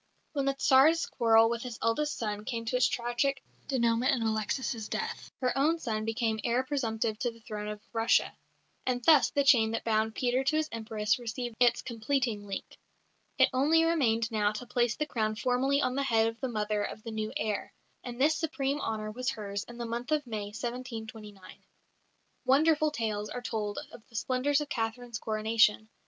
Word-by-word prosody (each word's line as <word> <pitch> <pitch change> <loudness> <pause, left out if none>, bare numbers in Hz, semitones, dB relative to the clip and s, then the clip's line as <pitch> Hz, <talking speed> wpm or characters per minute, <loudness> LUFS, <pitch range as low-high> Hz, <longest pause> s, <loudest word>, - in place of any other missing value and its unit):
When 280 -2 -1
the 275 0 +1
Tsar's 275 +5 +5
quarrel 225 -1 +4
with 235 0 -2
his 245 -2 -6
eldest 295 +7 0
son 210 -2 -3
came 230 0 -4
to 225 - -1
its 250 - +4
tragic 245 +3 -1 0.2
dénouement 235 -2 +2
in 250 -4 0
Alexis' 220 +1 -1
death, - - -4
her 250 -1 +1
own 305 +5 +3
son 220 -8 -3
became 225 -1 -1
heir 245 +2 +1
presumptive 225 -5 -2
to 245 - 0
the 230 0 -13
throne 215 -2 -6
of 210 0 -6
Russia. 225 0 +2 0.5
And 245 -1 -1
thus 310 -4 +6
the 285 - +1
chain 235 -5 +5
that 230 - -2
bound 220 0 +1
Peter 250 +1 +1
to 275 +3 +1
his 310 0 +1
Empress 220 -1 -1
received 240 0 -5
its 245 -1 +4
completing 235 -3 -1
link. 195 - -7 0.6
It - - +5
only 305 +5 +4
remained 235 -9 +2
now 210 -2 +2
to 230 +4 -6
place 240 -2 +1
the 300 - -1
crown 215 -6 -1
formally 260 +5 +1
on 250 - +1
the 275 - 0
head 225 -5 +3
of 225 0 -3
the 260 - -2
mother 210 -2 -1
of 215 +1 -5
the 230 - -6
new 215 0 -3
heir, 215 -7 -2 0.3
and 245 -1 -7
this 305 +4 +4
supreme 285 -3 -1
honour 215 -1 -3
was 250 +3 -2
hers 200 -3 -4
in 240 - -11
the 240 - -4
month 235 +4 -4
of 300 -2 +1
May, 215 -4 -4
1729. 220 -2 -7 0.8
Wonderful 310 +3 +4
tales 215 -7 -3
are - - -4
told 210 -3 -3
of - - -12
the 230 - -18
splendours 265 +5 +1
of 295 - -5
Catherine's 230 0 -3
coronation. 220 0 +2
235 Hz, 190 wpm, -30 LUFS, 220-265 Hz, 0.8 s, thus